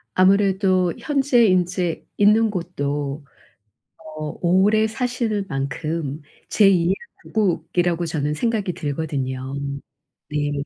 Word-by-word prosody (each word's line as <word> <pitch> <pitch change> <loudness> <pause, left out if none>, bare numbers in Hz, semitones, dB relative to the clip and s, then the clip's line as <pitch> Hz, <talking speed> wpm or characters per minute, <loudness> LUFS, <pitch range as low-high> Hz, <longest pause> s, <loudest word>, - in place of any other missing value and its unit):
아무래도 190 -1 +3
현재 275 -5 +2
인제 180 -2 0
있는 215 +2 +4
곳도 145 -6 -3 0.9
어 155 -1 -5
오래 195 +5 +3
사실 230 -3 -2
만큼 140 +2 -3 0.3
제2 190 -5 +4
의 - - +3 0.4
고국이라고 175 -4 0
저는 150 -2 -1
생각이 210 +1 -1
들거든요. 135 -4 -3 0.8
네. 145 0 -1
180 Hz, 205 characters per minute, -22 LUFS, 150-205 Hz, 0.9 s, 있는